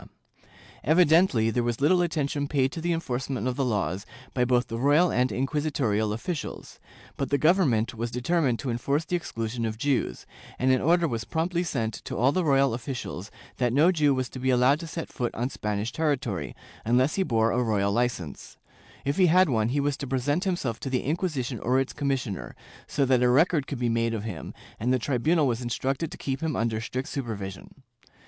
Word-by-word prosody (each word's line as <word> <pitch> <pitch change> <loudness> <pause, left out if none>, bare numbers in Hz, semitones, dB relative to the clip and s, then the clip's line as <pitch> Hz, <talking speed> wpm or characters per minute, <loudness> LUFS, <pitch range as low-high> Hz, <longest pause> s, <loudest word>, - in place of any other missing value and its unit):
^ - - -14 0.8
Evidently 155 -6 +4
there 120 - +1
was 120 -1 -1
little 175 +6 +4
attention 150 -4 -1
paid 135 -2 +1
to 165 - -6
the 175 +1 0
enforcement 135 -5 -2
of 125 - -1
the 135 - 0
laws 100 -6 -1 0.3
by 125 - +1
both 125 0 +2
the 115 - -5
royal 150 +7 +4
and 125 +1 +1
inquisitorial 135 -6 0
officials, 150 - -5 0.4
but 135 - -2
the 140 - +2
Government 145 - +3
was 115 +1 -3
determined 125 +1 +1
to 130 0 -3
enforce 140 +6 -1
the 180 - -1
exclusion 115 -7 -3
of 110 -1 -2
Jews, 130 - -1 0.3
and 130 +1 +2
an 130 - +3
order 170 +2 +3
was 115 -6 -3
promptly 170 - -1
sent 115 -10 -2
to - - -4
all 130 +4 +4
the 185 +4 0
royal 135 -4 +3
officials 120 -6 -5 0.3
that 125 -2 +1
no 155 +7 +5
Jew 150 -5 +3
was 130 -1 -1
to 130 - -8
be 130 +1 0
allowed 130 +3 +4
to 165 - -7
set 165 0 -5
foot 120 -2 -2
on 125 +4 -2
Spanish 105 0 -2
territory, 125 - -1 0.3
unless 125 +6 +2
he 195 - 0
bore 115 -9 +2
a 125 - +1
royal 105 -4 +1
licence; 105 - -2 0.5
if 140 +1 0
he 185 -2 +5
had 180 +1 +5
one, 110 -3 +1
he 140 +4 0
was 145 0 +1
to 140 - -5
present 145 +7 0
himself 140 - -1
to 135 - -4
the 130 -1 0
Inquisition 140 - -2
or 125 +5 +2
its 135 - -2
commissioner, 135 -8 -3 0.3
so 140 - +1
that 130 -1 +3
a 125 - +4
record 150 +2 +3
could 140 - -4
be 120 0 0
made 115 0 +1
of 105 - -4
him, 105 -7 -6 0.3
and 120 +4 0
the 130 - +4
tribunal 145 +6 +1
was 120 -2 0
instructed 130 +6 -2
to - - -9
keep 135 -1 -3
him 160 -3 -1
under 115 -1 -1
strict 130 +4 -4
supervision. 110 -2 -6
130 Hz, 205 wpm, -26 LUFS, 115-150 Hz, 0.8 s, no